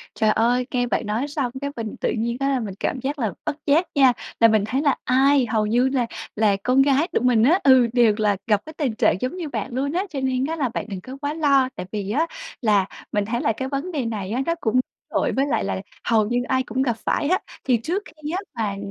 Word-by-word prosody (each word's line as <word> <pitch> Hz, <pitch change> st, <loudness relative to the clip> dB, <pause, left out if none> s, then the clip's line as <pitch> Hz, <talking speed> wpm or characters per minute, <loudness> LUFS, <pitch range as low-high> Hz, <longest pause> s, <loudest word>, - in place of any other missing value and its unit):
Trời 215 Hz, 0 st, +2 dB
ơi, 240 Hz, +3 st, +2 dB
nghe 245 Hz, -2 st, 0 dB
bạn 235 Hz, -, -1 dB
nói 230 Hz, +7 st, -1 dB
xong 280 Hz, -5 st, -2 dB
cái 280 Hz, 0 st, -3 dB
mình 225 Hz, -2 st, -5 dB
tự -, -, +1 dB
nhiên 235 Hz, +2 st, -1 dB
á 275 Hz, -, +1 dB
là 270 Hz, -2 st, +1 dB
mình 200 Hz, -4 st, -5 dB
cảm 260 Hz, -, -1 dB
giác 280 Hz, +4 st, -3 dB
là 220 Hz, -6 st, -1 dB
bất 290 Hz, -, -1 dB
giác 315 Hz, +5 st, +3 dB
nha, 270 Hz, -3 st, +6 dB, 0.3 s
là 230 Hz, -, +8 dB
mình 215 Hz, -2 st, +3 dB
thấy 260 Hz, +6 st, -1 dB
là 280 Hz, -3 st, +2 dB
ai 265 Hz, +1 st, +4 dB
hầu 220 Hz, -1 st, 0 dB
như 245 Hz, +4 st, +2 dB
là 255 Hz, -3 st, 0 dB, 0.3 s
là 210 Hz, -2 st, +3 dB
con 255 Hz, +4 st, +4 dB
gái 280 Hz, +4 st, +2 dB
tụi 245 Hz, -, 0 dB
mình 235 Hz, -3 st, +4 dB
á 325 Hz, +9 st, +5 dB
ừ, 260 Hz, -3 st, +6 dB
đều 235 Hz, -4 st, +4 dB
là 210 Hz, -2 st, +2 dB
gặp 210 Hz, -3 st, +3 dB
cái 315 Hz, -, -8 dB
tình 265 Hz, -7 st, 0 dB
trạng 215 Hz, -, +3 dB
giống 255 Hz, +8 st, -2 dB
như 340 Hz, -4 st, -4 dB
bạn 235 Hz, -2 st, -4 dB
luôn 280 Hz, +3 st, -1 dB
á, 365 Hz, +3 st, 0 dB
cho 275 Hz, -, -4 dB
nên 260 Hz, 0 st, 0 dB
á 325 Hz, +2 st, -3 dB
là 275 Hz, -5 st, 0 dB
bạn 235 Hz, -, -4 dB
đừng 195 Hz, -3 st, -5 dB
có 255 Hz, +7 st, -9 dB
quá 290 Hz, +1 st, -2 dB
lo 280 Hz, -4 st, +3 dB
tại -, -, -5 dB
vì 205 Hz, -1 st, -3 dB
á, 305 Hz, +8 st, +1 dB, 0.4 s
là 205 Hz, -4 st, +3 dB, 0.3 s
mình 205 Hz, -1 st, +1 dB
thấy 235 Hz, +3 st, -2 dB
là 225 Hz, -, +1 dB
cái 260 Hz, +4 st, -4 dB
vấn 285 Hz, +6 st, -3 dB
đề 280 Hz, -5 st, -1 dB
này 210 Hz, -4 st, -4 dB
á 250 Hz, +5 st, 0 dB
nó 335 Hz, -, +1 dB
cũng 250 Hz, +2 st, +2 dB, 0.3 s
tội -, -, 0 dB
với 270 Hz, +1 st, +1 dB
lại 285 Hz, -, 0 dB
là -, -, -2 dB, 0.2 s
hầu 220 Hz, -3 st, +3 dB
như 240 Hz, +1 st, +1 dB
ai 260 Hz, 0 st, +2 dB
cũng 255 Hz, +2 st, -2 dB
gặp 240 Hz, -4 st, 0 dB
phải 290 Hz, -, 0 dB
á. 370 Hz, -, +3 dB, 0.3 s
Thì 250 Hz, -3 st, +3 dB
trước 340 Hz, -, -2 dB
khi 305 Hz, -1 st, -8 dB
á 355 Hz, -, -1 dB, 0.2 s
mà 205 Hz, -3 st, -2 dB
255 Hz, 265 wpm, -23 LUFS, 220-280 Hz, 0.4 s, là